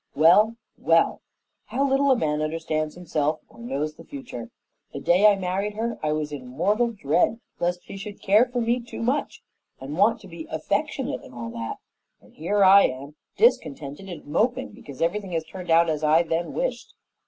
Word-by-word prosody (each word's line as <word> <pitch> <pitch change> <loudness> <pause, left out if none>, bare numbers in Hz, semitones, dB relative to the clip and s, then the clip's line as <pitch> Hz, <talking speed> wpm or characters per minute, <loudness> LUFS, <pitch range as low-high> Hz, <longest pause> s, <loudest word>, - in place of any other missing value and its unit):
Well, 200 +9 +5 0.2
well; - - +3 0.4
how 275 +3 0
little 275 +1 +2
a 265 - +6
man 150 -5 0
understands 155 0 -2
himself 155 -3 -1
or 235 - -19
knows 155 - -3
the - - -14
future! 260 - -8 0.4
The - - -5
day 185 +5 +5
I 205 - +6
married 195 +2 -2
her 230 +1 -3
I 155 - 0
was 150 -1 -2
in 135 -4 -7
mortal 200 - +1
dread 205 +2 +1 0.2
lest 175 +1 -1
she - - -8
should 200 +1 -8
care 210 +5 +4
for 245 0 -2
me 235 +2 +1
too 235 -1 -7
much 260 +5 -1 0.4
and 135 +3 -6
want 225 +3 +4
to 195 - -12
be 165 -2 -9
affectionate 205 - -2
and 125 - -14
all 115 -1 -6
that; 115 -1 -5 0.4
and - - -22
here 200 +6 +1
I 195 +1 +8
am, 135 +3 -4 0.2
discontented 155 - +1
and 175 - -8
moping 245 - 0
because 140 +1 -7
everything 190 +2 -1
has 165 -1 0
turned 180 +2 -10
out 165 +1 +5
as 155 -1 -1
I 155 +2 +4
then 165 +1 -2
wished. - - -3
180 Hz, 190 wpm, -25 LUFS, 155-220 Hz, 0.4 s, I